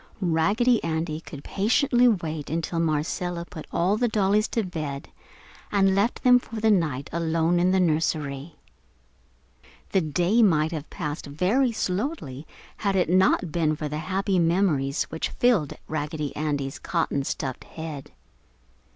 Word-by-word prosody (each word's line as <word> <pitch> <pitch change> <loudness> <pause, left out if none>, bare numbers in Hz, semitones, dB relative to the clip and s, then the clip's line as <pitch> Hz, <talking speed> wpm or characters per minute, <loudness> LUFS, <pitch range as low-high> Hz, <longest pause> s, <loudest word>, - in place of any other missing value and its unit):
Raggedy 205 +8 +2
Andy 160 -1 -2
could 145 -3 -10
patiently 245 +5 +2
wait 160 -9 -1
until 165 +2 -2
Marcella 170 +2 -1
put 160 -2 -10
all 185 +5 +1
the 245 - +2
dollies 210 0 +2
to 225 - -1
bed 155 -7 -5 0.6
and 195 -2 +3
left 200 +5 0
them 250 -1 +7
for 230 - -11
the 220 0 +3
night, 155 -9 0
alone 165 +1 +1
in 180 +1 +3
the 190 0 +3
nursery. 155 -3 -1 1.4
The 190 - +3
day 175 +8 +2
might 160 -7 +3
have 155 -3 -5
passed 150 0 -5
very 195 - +1
slowly 185 - -3 0.3
had 200 -2 0
it 180 -3 +2
not 185 -2 +3
been 155 -2 +1
for 150 0 -4
the 150 +1 -4
happy 190 +3 0
memories 165 -5 +1
which 160 - -2
filled 225 - +2
Raggedy 150 -1 -3
Andy's 145 -3 -2
cotton 165 -5 -1
stuffed 130 -1 -4
head. 160 -4 -8
170 Hz, 140 wpm, -25 LUFS, 155-195 Hz, 1.4 s, them